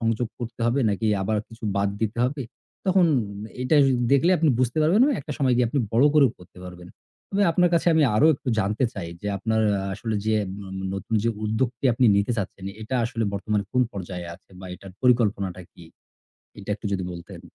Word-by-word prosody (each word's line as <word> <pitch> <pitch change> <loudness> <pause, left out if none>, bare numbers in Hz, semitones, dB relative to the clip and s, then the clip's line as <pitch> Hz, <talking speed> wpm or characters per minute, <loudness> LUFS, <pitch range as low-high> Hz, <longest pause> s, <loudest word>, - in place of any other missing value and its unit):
সংযোগ 115 0 0
করতে 120 -1 -7
হবে 130 +4 +1
নাকি 105 +2 -1 0.2
আবার 110 +2 0
কিছু 115 -1 -12
বাদ 100 0 +2
দিতে 110 +1 -2
হবে? 135 +1 -2 0.4
তখন 185 -2 +4 0.6
এটা 130 +5 +2 0.4
দেখলে 140 +6 +4
আপনি 160 0 +3
বুঝতে 130 +4 0
পারবেন 170 +8 +3
বা - - +2
একটা 150 - -6
সময় 130 -4 +2
গিয়ে 125 -1 +3
আপনি 140 - -1
বড় 120 +5 +4
করেও 140 -6 +5
করতে 90 0 -17
পারবেন। 90 -1 -10 0.4
তবে 200 +1 +1
আপনার 180 +1 +3
কাছে 170 - +1
আমি 160 - +4
আরও 150 - +5
একটু 130 - -8
জানতে 105 +5 0
চাই 85 -4 -5
যে, - - -6
আপনার 110 +2 0 0.2
আ - - -1 0.2
আসলে 110 +2 -4
যে 110 - +2 0.3
ন - - -8 0.3
নতুন 100 +3 -4
যে - - +3 0.2
উদ্যোগটি 115 +4 -2
আপনি 120 +1 +3
নিতে 100 +4 +1
চাচ্ছেন 95 -1 -5 0.2
এটা 110 +4 -4
আসলে 115 -1 -2
বর্তমানে 100 +1 -1
কোন 125 - +3
পর্যায়ে 90 -2 -6
আছে 90 - -21
বা 95 - -8
এটার 95 0 -12
পরিকল্পনাটা 105 -7 +1
কি? 85 - -14 0.7
এটা 100 +1 -7
একটু 105 - -7
যদি 95 -2 -1
বলতেন। 85 -1 -10
110 Hz, 200 wpm, -24 LUFS, 100-130 Hz, 0.7 s, করেও